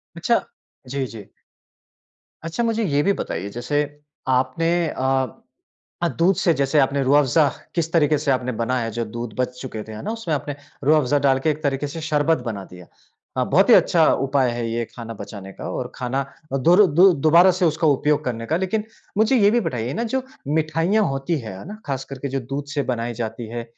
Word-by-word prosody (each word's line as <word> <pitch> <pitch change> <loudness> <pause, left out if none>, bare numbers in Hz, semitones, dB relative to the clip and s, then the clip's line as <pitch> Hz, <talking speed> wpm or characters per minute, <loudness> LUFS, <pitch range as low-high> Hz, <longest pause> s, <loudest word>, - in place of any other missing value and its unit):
अच्छा। - - +2 0.5
जी, 135 0 -2
जी। 110 -4 -11 1.1
अच्छा 165 +8 -2
मुझे 230 -1 0
ये 145 -5 +2
भी 200 - +3
बताइए 95 - -4
जैसे 125 +7 -1 0.5
आपने 135 +6 0 0.2
अ 130 -1 0 0.7
अ, 170 - +2
दूध 175 +3 +2
से 170 - +2
जैसे 140 +1 +2
आपने 140 0 +2
रूह 135 +2 +4
अफ़ज़ा 145 +2 +3 0.3
किस 165 -2 -1
तरीके 155 -2 +4
से 145 -1 0
आपने 125 -1 0
बनाया 125 +1 0
है 115 - -3
जो 120 - 0
दूध 115 0 -6
बच 125 0 -2
चुके 115 -5 -6
थे 110 - -11
है 110 0 -7
ना, - - -2
उसमें 225 -8 -3
आपने 145 0 -4 0.3
रूह 155 +3 +5
अफ़ज़ा 145 +1 +1
डालके 135 +3 +3
एक 150 +1 -6
तरीके 140 0 0
से 160 +3 -7
शरबत 155 0 +2
बना 105 -4 -4
दिया। 90 -1 -13 0.5
हाँ, - - +2
बहुत - - +4
ही - - +9
अच्छा - - +4 0.2
उपाय 135 -2 +2
है 120 0 -3
ये 115 +1 -2
खाना 115 -1 -7
बचाने 100 -2 -9
का - - -7
और - - -4
खाना 130 +2 -2 0.3
अ, - - +2
दुर 175 +10 +6
दु 180 +6 +6
दोबारा 170 +5 +5
से 180 - +3
उसका 160 0 +2
उपयोग 150 +1 +2
करने 115 -2 -3
का। 160 +7 0
लेकिन 190 +4 -1 0.3
मुझे 220 +4 +4
ये 205 0 +5
भी 240 - +3
बताइए 125 -2 -3
ना 230 - -2
जो 265 - 0 0.2
मिठाइयाँ 160 +7 +1
होती 135 +4 -1
हैं। 110 -6 -7
है - - -10
ना? 210 +2 -8
ख़ास 135 -1 -3
करके 135 0 -5
जो 135 +1 -1
दूध 135 +3 -5
से 145 - +1
बनाई 120 0 -3
जाती 115 0 -5
है, 120 0 -4
140 Hz, 210 wpm, -22 LUFS, 120-160 Hz, 1.1 s, ही